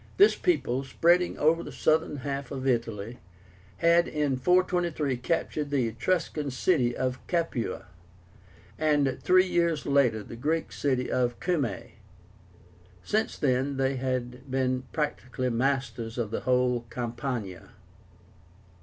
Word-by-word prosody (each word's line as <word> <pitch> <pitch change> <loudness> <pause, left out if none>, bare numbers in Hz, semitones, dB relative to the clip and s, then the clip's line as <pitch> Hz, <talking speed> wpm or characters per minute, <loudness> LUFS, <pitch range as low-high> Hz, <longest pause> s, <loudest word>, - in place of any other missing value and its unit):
This 405 +2 +6
people, 135 - 0
spreading 170 +6 +2
over 160 +3 +3
the - - -8
southern 155 -1 +1
half 140 0 -3
of 135 -2 -5
Italy, 115 -2 -1 0.6
had 170 +1 +4
in 150 -3 0
423 175 -2 +1
captured 150 +2 -2
the 135 -5 +1
Etruscan 150 +4 -1
city 130 -2 +1
of 130 0 -1
CAPUA, 165 -9 -2 0.9
and 145 -4 +2
three 185 +1 +5
years 170 -4 0
later 130 -7 +2
the 115 - -9
Greek 155 +7 -1
city 130 -3 -1
of 120 -1 0
CUMAE. 140 - -2 1.0
Since 215 +1 -1
then 135 0 0
they 135 0 +1
had 125 0 -3
been 130 -1 0
practically 130 -4 -2
masters 120 -2 -1
of 115 -3 -2
the - - -1
whole 125 0 +2
of 120 -1 -11
Campania. 120 -5 -4
135 Hz, 125 wpm, -28 LUFS, 125-155 Hz, 1.0 s, This